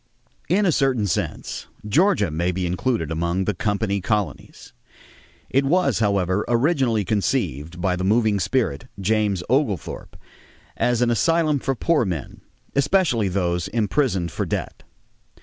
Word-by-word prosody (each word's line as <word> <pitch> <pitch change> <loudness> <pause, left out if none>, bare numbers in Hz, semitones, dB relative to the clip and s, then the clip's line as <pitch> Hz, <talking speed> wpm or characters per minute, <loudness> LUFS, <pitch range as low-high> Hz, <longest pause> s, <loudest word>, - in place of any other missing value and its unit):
In 200 +5 +3
a 180 - +4
certain 135 -7 +1
sense, 100 - -3 0.2
Georgia 150 - +3
may 85 +4 0
be 90 0 -2
included 90 - -1
among 85 +3 -1
the 105 - 0
"company 100 0 -1
colonies." 105 +1 -3 0.8
It 135 +2 +3
was, 140 - +2
however, 100 -2 +1
originally 120 - +2
conceived 90 - -1
by 90 0 +1
the 90 - -3
moving 105 +1 +2
spirit, 95 - -1
James 100 -2 +1
Oglethorpe, 120 - -1 0.6
as 120 0 +1
an 120 - +2
asylum 155 - +2
for 135 0 -1
poor 165 +3 +2
men, 90 - -5 0.3
especially 140 - +2
those 90 -2 -1
imprisoned 105 - 0
for - - -2
debt. - - -4
105 Hz, 130 wpm, -22 LUFS, 90-135 Hz, 0.8 s, a